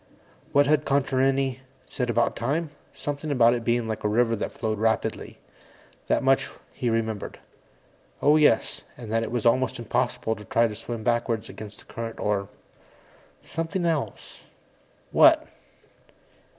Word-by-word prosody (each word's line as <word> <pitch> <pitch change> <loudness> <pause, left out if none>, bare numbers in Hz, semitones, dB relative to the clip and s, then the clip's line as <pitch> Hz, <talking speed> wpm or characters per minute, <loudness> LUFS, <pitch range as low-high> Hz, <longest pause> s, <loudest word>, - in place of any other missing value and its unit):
_ - - -32 0.5
What 145 0 +5
had 150 +2 +3
Contarini 135 -1 +1 0.3
said 125 -4 -3
about 120 0 +1
time? 150 +6 -1 0.2
Something 145 +1 -5
about 120 -4 +5
its 120 -1 -2
being 120 0 +1
like 110 -1 -4
a - - +2
river 115 +2 +2
that 105 - -4
flowed 110 -2 -3
rapidly 110 0 -1 0.7
that - - +1
much 135 0 +3 0.2
he 125 - -1
remembered. 110 -2 -2 0.8
Oh, 150 +2 +5
yes 150 -1 +3 0.2
and 115 -3 -8
that 115 0 +2
it 115 - -3
was 120 -2 -2
almost 130 +2 +2
impossible 120 -1 -1
to 105 - -10
try 115 +4 +3
to 105 - -6
swim 115 0 -6
backwards 120 -1 0
against 105 -2 -9
the - - -17
current 115 -1 -6
or... 100 -1 -1 0.9
something 165 +2 -3
else. 160 -4 -3 0.7
What? - - +6
120 Hz, 150 wpm, -25 LUFS, 115-135 Hz, 0.9 s, What